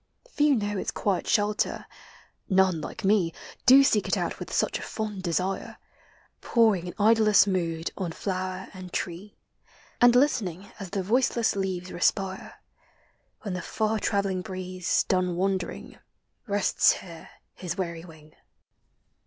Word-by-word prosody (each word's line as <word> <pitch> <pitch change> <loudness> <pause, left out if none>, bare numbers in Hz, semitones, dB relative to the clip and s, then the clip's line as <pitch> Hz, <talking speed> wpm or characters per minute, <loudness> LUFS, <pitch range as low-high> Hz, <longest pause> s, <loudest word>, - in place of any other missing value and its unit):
Few 295 - +3
know 205 -3 -2
its - - -3
quiet 195 -4 -1
shelter,— 210 -1 0 0.6
none, 190 -4 +3
like 220 - -7
me, 190 -5 +3 0.3
Do 270 +2 +9
seek 215 -6 +2
it - - +1
out - - -3
with - - -7
such - - 0
a - - -8
fond 210 -3 -5
desire, 185 +2 -2 0.6
Poring 215 -7 +2
in 175 - -6
idlesse 215 -2 +5
mood 170 -4 -2
on 185 -4 -3
flower 185 +1 -4
and 185 -1 -9
tree, 185 +5 -5 0.6
And 245 0 +7
listening 205 - +1
as 195 -3 -7
the 195 0 -2
voiceless 235 +2 +1
leaves 185 -2 -3
respire 190 +1 -1 0.4
— - - -40
When 200 -4 -4
the 180 - -3
far 220 +4 -1
travelling 195 -2 0
breeze, 185 -1 -2
done 180 -2 0
wandering, 190 0 -3 0.5
Rests 200 -1 +3
here 170 -3 -10 0.2
his 175 0 -5
weary 170 -3 -4
wing. 155 -3 -15
190 Hz, 140 wpm, -26 LUFS, 180-210 Hz, 0.6 s, Do